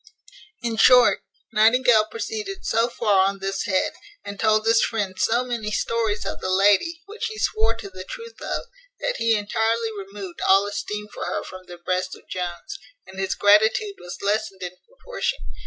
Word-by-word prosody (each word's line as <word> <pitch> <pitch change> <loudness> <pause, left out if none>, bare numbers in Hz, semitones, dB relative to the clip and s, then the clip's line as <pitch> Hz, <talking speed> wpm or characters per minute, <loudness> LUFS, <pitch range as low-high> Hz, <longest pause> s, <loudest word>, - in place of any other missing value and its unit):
In 230 -2 -2
short, 250 +1 +6 0.3
Nightingale 220 0 +5
proceeded 390 - -5
so 230 +1 +2
far 200 -5 +3
on 195 0 -2
this 195 0 -3
head, 190 -4 +1 0.3
and 200 0 -7
told 215 0 +3
his 225 0 +5
friend 205 -4 -1
so 235 +2 +2
many 235 -4 -3
stories 220 0 -1
of - - -4
the 185 - -2
lady, 205 - +3
which 420 +2 -4
he 435 - -7
swore 225 - +1
to 225 - -8
the 185 -1 -9
truth 460 - -10
of, - - -3 0.4
that - - -1
he 230 0 +3
entirely 225 +2 0
removed 195 -2 -8
all 195 +1 +5
esteem 210 +1 -4
for - - -5
her - - -2
from 185 0 -11
the 175 - -10
breast 185 +1 -2
of - - -19
Jones; 180 - -5 0.3
and 190 - -11
his 190 -1 -1
gratitude 220 - +4
was 175 - -8
lessened 205 -2 -1
in 180 0 -6
proportion. - - -3
215 Hz, 175 wpm, -23 LUFS, 195-235 Hz, 0.4 s, short